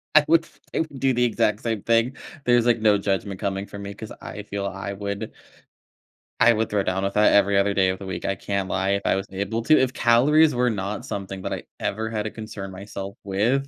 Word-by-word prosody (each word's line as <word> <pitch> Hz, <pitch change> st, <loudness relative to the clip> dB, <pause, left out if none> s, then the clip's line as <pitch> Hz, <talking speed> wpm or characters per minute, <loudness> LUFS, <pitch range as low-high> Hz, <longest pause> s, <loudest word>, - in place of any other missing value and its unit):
I 150 Hz, -1 st, +7 dB
would 165 Hz, +1 st, +4 dB, 0.3 s
I -, -, 0 dB
would 145 Hz, -4 st, -6 dB
do 135 Hz, -1 st, +2 dB
the 125 Hz, 0 st, +2 dB
exact 110 Hz, -2 st, +1 dB
same 115 Hz, -4 st, -2 dB
thing. 115 Hz, +3 st, +2 dB, 0.3 s
There's, 120 Hz, -1 st, +4 dB
like, 120 Hz, -2 st, +3 dB
no 105 Hz, -2 st, +5 dB
judgment 100 Hz, -1 st, -2 dB
coming 95 Hz, 0 st, -2 dB
from 100 Hz, 0 st, -9 dB
me 100 Hz, 0 st, -6 dB
'cause 110 Hz, 0 st, -9 dB
I 105 Hz, -, -7 dB
feel 100 Hz, -1 st, -4 dB
I 95 Hz, +1 st, -5 dB
would 100 Hz, 0 st, -5 dB, 1.1 s
I 120 Hz, -, +6 dB
would 110 Hz, 0 st, -1 dB
throw 105 Hz, -1 st, +1 dB
down 95 Hz, +1 st, -1 dB
with 100 Hz, 0 st, -1 dB
that 105 Hz, 0 st, +5 dB
every 100 Hz, 0 st, +4 dB
other 100 Hz, +1 st, +3 dB
day 95 Hz, -1 st, +3 dB
of 95 Hz, +1 st, -2 dB
the 100 Hz, -, -8 dB
week. 95 Hz, -, -5 dB
I 95 Hz, -, 0 dB
can't 100 Hz, -2 st, -3 dB
lie 95 Hz, +1 st, 0 dB
if 100 Hz, 0 st, 0 dB
I -, -, +3 dB
was 95 Hz, 0 st, -3 dB
able 100 Hz, +4 st, -2 dB
to. 155 Hz, +6 st, +5 dB
If 130 Hz, -1 st, +1 dB
calories 140 Hz, +5 st, +4 dB
were 125 Hz, 0 st, +2 dB
not 100 Hz, -1 st, -3 dB
something 95 Hz, -1 st, -5 dB
that -, -, -2 dB
I -, -, -5 dB, 0.2 s
ever 110 Hz, +2 st, -2 dB
had 105 Hz, -2 st, -2 dB
to 110 Hz, -, -4 dB
concern 110 Hz, -3 st, -7 dB
myself 100 Hz, 0 st, -7 dB
with. 115 Hz, +8 st, +1 dB
100 Hz, 235 wpm, -24 LUFS, 100-115 Hz, 1.1 s, I